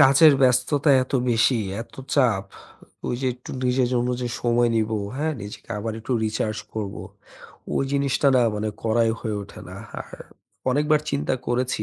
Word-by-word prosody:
কাজের 140 Hz, +3 st, +8 dB
ব্যস্ততা 130 Hz, +4 st, +3 dB
এত 130 Hz, -, -8 dB, 0.2 s
বেশি, 115 Hz, +1 st, +3 dB, 0.2 s
এত -, -, -18 dB, 0.2 s
চাপ, 115 Hz, -8 st, +3 dB, 0.6 s
ওই -, -, -1 dB
যে 130 Hz, -, -1 dB
একটু 125 Hz, -, -11 dB
নিজের 125 Hz, 0 st, +2 dB
জন্য 120 Hz, 0 st, +1 dB
যে 125 Hz, -, -2 dB
সময় 120 Hz, 0 st, +3 dB
নিব, 110 Hz, 0 st, +1 dB, 0.3 s
হ্যাঁ 155 Hz, +2 st, 0 dB
নিজেকে 105 Hz, +2 st, -9 dB
আবার 110 Hz, +1 st, -3 dB
একটু 115 Hz, +3 st, -4 dB
recharge 110 Hz, 0 st, -1 dB
করব, 105 Hz, -2 st, -3 dB, 0.8 s
ওই 135 Hz, -, +1 dB
জিনিসটা 140 Hz, 0 st, +2 dB
না 125 Hz, -, +5 dB
মানে 105 Hz, +1 st, -2 dB
করাই 115 Hz, 0 st, +2 dB
হয়ে 110 Hz, -3 st, -2 dB
ওঠে -, -, -11 dB
না। -, -, -9 dB, 0.3 s
আর -, -, -12 dB, 0.6 s
অনেকবার 150 Hz, +3 st, +3 dB
চিন্তা 140 Hz, -1 st, 0 dB
করেছি 120 Hz, -2 st, 0 dB
125 Hz, 160 wpm, -24 LUFS, 110-135 Hz, 0.8 s, কাজের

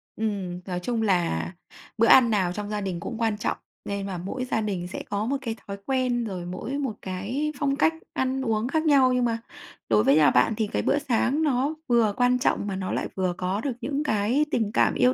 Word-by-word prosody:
Ừm, 195 Hz, -5 st, -3 dB
nói 180 Hz, -2 st, -3 dB
chung 230 Hz, +4 st, -2 dB
là 175 Hz, -, +1 dB, 0.5 s
bữa 230 Hz, -, +4 dB
ăn 245 Hz, -3 st, +7 dB
nào 190 Hz, -5 st, +1 dB
trong 210 Hz, +1 st, -5 dB
gia 210 Hz, -1 st, -2 dB
đình 185 Hz, -3 st, -3 dB
cũng 225 Hz, +5 st, -5 dB
quan 225 Hz, -2 st, 0 dB
trọng -, -, -1 dB, 0.3 s
nên 200 Hz, -1 st, -3 dB
và 185 Hz, -2 st, -4 dB
mỗi 250 Hz, +9 st, -4 dB
gia 220 Hz, -3 st, 0 dB
đình 190 Hz, -4 st, -3 dB
sẽ -, -, -6 dB
có 205 Hz, +1 st, -1 dB
một 275 Hz, +3 st, 0 dB
cái 225 Hz, -2 st, -3 dB
thói 200 Hz, 0 st, -5 dB
quen 255 Hz, -3 st, +1 dB
rồi 185 Hz, -5 st, -5 dB
mỗi 185 Hz, +10 st, -4 dB
một 265 Hz, -7 st, -2 dB
cái 220 Hz, +12 st, -2 dB
phong 275 Hz, -2 st, +1 dB
cách 320 Hz, +2 st, +3 dB, 0.2 s
ăn 260 Hz, 0 st, 0 dB
uống 225 Hz, -1 st, 0 dB
khác 315 Hz, +3 st, 0 dB
nhau, 270 Hz, -4 st, +5 dB
nhưng 250 Hz, -1 st, +2 dB
mà 230 Hz, -1 st, 0 dB, 0.5 s
đối 110 Hz, -1 st, +4 dB
với 140 Hz, -, +5 dB
nhà 150 Hz, -2 st, +6 dB
bạn 125 Hz, -, +3 dB
thì 220 Hz, -2 st, 0 dB
cái -, -, -1 dB
bữa 290 Hz, -, +2 dB
sáng 275 Hz, +3 st, +1 dB
nó 280 Hz, +2 st, +1 dB
vừa 230 Hz, -4 st, +3 dB
quan 250 Hz, 0 st, +3 dB
trọng 205 Hz, -, +1 dB
mà 195 Hz, -, -2 dB
nó 190 Hz, -1 st, -3 dB
lại -, -, -1 dB
vừa 185 Hz, -2 st, 0 dB
có 190 Hz, +3 st, -1 dB
được 275 Hz, -, -1 dB
những 290 Hz, +1 st, -1 dB
cái 235 Hz, +4 st, +1 dB
tình 220 Hz, -3 st, 0 dB
cảm -, -, +3 dB
yêu 250 Hz, +1 st, +3 dB
220 Hz, 235 wpm, -26 LUFS, 190-255 Hz, 0.5 s, ăn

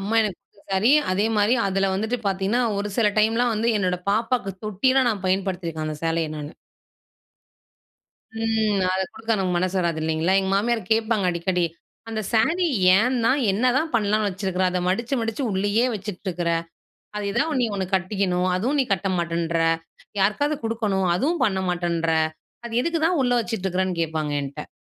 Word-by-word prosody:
அம்மா 205 Hz, +3 st, -2 dB
எனக்கு 205 Hz, -5 st, -3 dB
கொடுத்த 200 Hz, -, -28 dB
சாரி, 210 Hz, +8 st, +4 dB, 0.2 s
அதே 200 Hz, +3 st, +1 dB
மாரி 210 Hz, +4 st, +3 dB
அதில 195 Hz, 0 st, +1 dB
வந்துட்டு 220 Hz, +5 st, -1 dB
பார்த்தீங்கன்னா, 195 Hz, +5 st, +1 dB, 0.2 s
ஒரு 205 Hz, -, -2 dB
சில 225 Hz, -3 st, +4 dB
டைம்லாம் 230 Hz, +3 st, +2 dB
வந்து 220 Hz, +2 st, 0 dB
என்னோட 180 Hz, -2 st, 0 dB
பாப்பாக்கு 225 Hz, -1 st, 0 dB
தொட்டிலாம் 255 Hz, +5 st, +2 dB
நான் 200 Hz, -4 st, -4 dB
பயன்படுத்திருக்கேன் 185 Hz, -4 st, -1 dB
அந்த 155 Hz, -1 st, -5 dB
சேலய 165 Hz, -1 st, 0 dB
நானு. 150 Hz, 0 st, -6 dB, 1.9 s
ம். 220 Hz, -2 st, +1 dB
அத 190 Hz, -, 0 dB
கொடுக்க 225 Hz, +1 st, -2 dB
நமக்கு 185 Hz, -2 st, 0 dB
மனசு 185 Hz, +2 st, -1 dB
வராது 170 Hz, -2 st, -1 dB
இல்லைங்களா? 160 Hz, +4 st, +1 dB
எங்க 190 Hz, 0 st, -2 dB
மாமியார் 225 Hz, +3 st, +1 dB
கேட்பாங்க 220 Hz, -2 st, +1 dB
அடிக்கடி. 175 Hz, +1 st, 0 dB, 0.4 s
"அந்த 220 Hz, -1 st, -3 dB
சாரி 330 Hz, +11 st, +2 dB, 0.3 s
ஏன் 250 Hz, +5 st, +2 dB
தான், 260 Hz, +5 st, +3 dB
என்னதான் 255 Hz, +9 st, +1 dB
பண்ணலாம்னு 215 Hz, -1 st, +2 dB
வச்சுருக்கிற, 185 Hz, 0 st, -2 dB
அத 180 Hz, -, -1 dB
மடிச்சு, 235 Hz, +8 st, 0 dB
மடிச்சு 225 Hz, +4 st, -2 dB
உள்ளயே 205 Hz, +5 st, +1 dB
வச்சுட்டுருக்கிற. 185 Hz, -4 st, -3 dB, 0.7 s
அது 210 Hz, -1 st, -3 dB
எதா 280 Hz, -, +2 dB
ஒண்ணு 280 Hz, -4 st, 0 dB
நீ -, -, +3 dB
ஒண்ணு 190 Hz, -2 st, -2 dB
கட்டிக்கணும். 185 Hz, -1 st, 0 dB
அதுவும் 255 Hz, +10 st, 0 dB
நீ 265 Hz, -, +2 dB
கட்ட 195 Hz, 0 st, 0 dB
மாட்டேன்ற! 170 Hz, -1 st, -1 dB, 0.6 s
யாருக்காவது 285 Hz, +10 st, +1 dB
கொடுக்கணும். 215 Hz, -4 st, 0 dB
அதுவும் 310 Hz, -, 0 dB
பண்ண 195 Hz, -5 st, +1 dB
மாட்டேன்ற! 170 Hz, -2 st, -1 dB, 0.6 s
அது 235 Hz, -, -8 dB
எதுக்கு 335 Hz, +1 st, -1 dB
தான் 355 Hz, -1 st, +1 dB
உள்ள 245 Hz, -1 st, +1 dB
வச்சுட்டுருக்குறன்னு." 190 Hz, -5 st, -2 dB
கேட்பாங்க 155 Hz, -2 st, -2 dB
என்ட்ட. 140 Hz, +2 st, -7 dB
200 Hz, 160 wpm, -23 LUFS, 180-225 Hz, 1.9 s, சாரி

